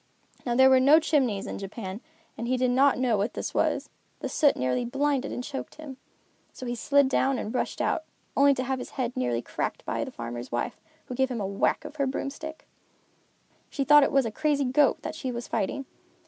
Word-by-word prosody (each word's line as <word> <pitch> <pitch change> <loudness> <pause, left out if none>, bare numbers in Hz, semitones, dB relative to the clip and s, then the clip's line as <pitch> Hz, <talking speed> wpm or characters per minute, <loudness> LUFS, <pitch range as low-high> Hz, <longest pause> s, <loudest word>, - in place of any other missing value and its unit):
Now 240 - +1
there 265 +1 +7
were 260 - +7
no 285 +5 +7
chimneys 260 - +1
in - - -5
Japan 195 +1 -6 0.3
and 235 - -5
he 255 +1 +1
did 250 0 +2
not 270 +2 +4
know 250 -3 +2
what 200 +3 -1
this - - -4
was. - - +1 0.3
The - - -3
soot 290 -3 +3
nearly 125 - 0
blinded 275 +2 0
and 245 - -4
choked 270 +1 -6
him. 295 -4 -9 0.6
So 255 - -8
he 240 - -2
slid 280 +3 +3
down 265 0 +1
and 220 - -4
rushed 250 - -2
out, 315 - 0 0.3
only 280 0 +5
to 255 - -2
have 260 0 -2
his - - -7
head 250 -2 -2
nearly 120 -2 -1
cracked - - -4
by - - -1
the - - -5
farmer's 120 +1 -7
wife, 120 - -3 0.2
who - - -6
gave 265 +1 +1
him 245 -3 -3
a 200 - -2
whack 195 +1 0
of 305 - -9
her 280 -2 +1
broomstick. 295 +4 -5 1.0
She 275 - -2
thought 295 +1 +7
it 275 - +2
was 270 -2 +3
a 225 - -2
crazy 290 +2 +1
goat 270 +2 +3
that 315 - -4
she 265 -5 -4
was 235 0 -5
fighting. 225 +6 -2
260 Hz, 220 wpm, -27 LUFS, 230-280 Hz, 1.0 s, there